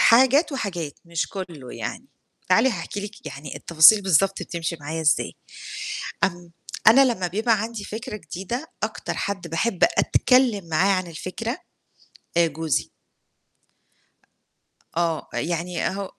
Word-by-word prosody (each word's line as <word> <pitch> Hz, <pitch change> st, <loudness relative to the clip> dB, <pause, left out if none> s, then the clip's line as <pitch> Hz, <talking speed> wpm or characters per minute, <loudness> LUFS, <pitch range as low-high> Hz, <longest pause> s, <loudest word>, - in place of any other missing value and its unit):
حاجات 265 Hz, +7 st, +5 dB
وحاجات، 175 Hz, -, -4 dB
مش 170 Hz, 0 st, -2 dB
كلّه 170 Hz, -10 st, -7 dB
يعني، 115 Hz, -, -5 dB, 0.4 s
تعالي 265 Hz, -, +5 dB
هاحكي 215 Hz, -4 st, -4 dB
لِك 205 Hz, +1 st, -9 dB
يعني 140 Hz, +1 st, -7 dB
التفاصيل 170 Hz, +6 st, +6 dB
بالضبط 195 Hz, +1 st, +2 dB
بتمشي 170 Hz, -1 st, -4 dB
معايا 160 Hz, +3 st, -4 dB
إزاي، 155 Hz, -1 st, +2 dB, 0.9 s
امم، 175 Hz, -2 st, -3 dB, 0.3 s
أنا 265 Hz, +5 st, +8 dB
لمّا 225 Hz, -8 st, 0 dB
بيبقى 215 Hz, +4 st, +1 dB
عندي 225 Hz, -2 st, -5 dB
فكرة 220 Hz, 0 st, -6 dB
جديدة 205 Hz, -, -6 dB
أكتر -, -, -3 dB
حد 195 Hz, -4 st, -3 dB
باحب 180 Hz, +4 st, +1 dB
أتكلّم 245 Hz, -8 st, +3 dB
معاه 180 Hz, +5 st, +3 dB
عن 185 Hz, -1 st, -1 dB
الفكرة، 185 Hz, -, -5 dB, 0.8 s
آآ 170 Hz, 0 st, +5 dB
جوزي. 160 Hz, -1 st, -1 dB, 2.1 s
آه، 165 Hz, -2 st, 0 dB
يعني 175 Hz, 0 st, -1 dB
هو 195 Hz, 0 st, -5 dB
185 Hz, 120 wpm, -24 LUFS, 165-220 Hz, 2.1 s, أنا